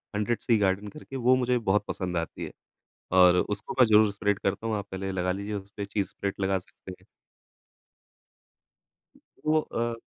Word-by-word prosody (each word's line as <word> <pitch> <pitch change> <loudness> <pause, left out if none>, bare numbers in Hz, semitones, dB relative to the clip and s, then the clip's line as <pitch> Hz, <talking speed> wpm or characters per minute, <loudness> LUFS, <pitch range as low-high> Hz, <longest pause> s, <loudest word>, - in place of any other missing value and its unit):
Hundred 105 +3 0
C 115 -3 +3
garden 100 0 +1
करके 135 +4 -10
वो 130 0 +4
मुझे 125 -1 +1
बहुत 105 -3 +1
पसंद 90 -2 -3
आती 85 -1 -4
है। - - -8 0.6
और 90 -1 +7
उसको 105 +2 -2
मैं 125 - +8
ज़रूर 105 -1 +5
स्प्रेड 100 0 0
करता 100 +3 -2
हूँ, 110 - 0
आप 100 -1 -4
पहले 95 0 -3
लगा 90 -1 0
लीजिए 100 +3 -4
उसपे 100 +1 -6
चीज़ 100 -1 -2
स्प्रेड 100 0 -4
लगा 95 0 +2
सकते 95 +1 -13
हैं। - - -24 2.4
वो 155 +1 +4
अ 120 -5 -3
100 Hz, 170 wpm, -27 LUFS, 95-115 Hz, 2.4 s, मैं